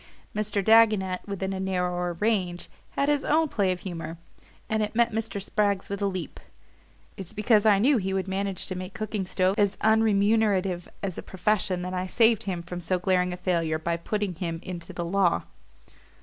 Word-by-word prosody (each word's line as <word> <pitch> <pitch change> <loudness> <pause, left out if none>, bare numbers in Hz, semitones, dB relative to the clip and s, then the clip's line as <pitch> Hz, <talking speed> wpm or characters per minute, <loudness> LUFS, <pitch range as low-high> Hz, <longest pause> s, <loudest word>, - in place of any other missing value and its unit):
Mr. 210 -1 -1
Dagonet, 215 -4 +4
within 195 -1 -3
a 190 - -4
narrower 180 -2 -1
range, 180 -2 -1 0.3
had 280 - +2
his 290 -1 +2
own 315 +2 +3
play 200 -9 +1
of 180 -1 -4
humour; 165 -3 -6 0.5
and 220 0 0
it 210 +1 -2
met 235 0 +3
Mr. 220 -2 -3
Spragg's 200 0 0
with 200 0 -4
a 200 - +2
leap. 185 -3 -5 0.8
"It's 195 0 -7
because 215 0 +3
I 205 -2 +6
knew 260 +7 +4
he 195 -2 -2
would 190 0 -1
manage 195 0 -2
to 185 - -4
make 185 +1 -7
cooking 215 -2 -3
stoves 185 +2 +1
as 205 -1 +2
unremunerative 205 -4 +2 0.2
as 190 -3 -3
a - - -4
profession 190 -1 0
that 180 +1 -4
I 185 0 -2
saved 225 +1 +3
him 180 -3 -3
from 180 +1 -6
so 185 +2 0
glaring 180 0 +1
a 180 - -5
failure 170 -3 0
by 170 +2 -1
putting 205 +3 -2
him 165 -1 -4
into 175 -2 -7
the 170 - -4
law." 180 0 +2
190 Hz, 190 wpm, -26 LUFS, 180-210 Hz, 0.8 s, I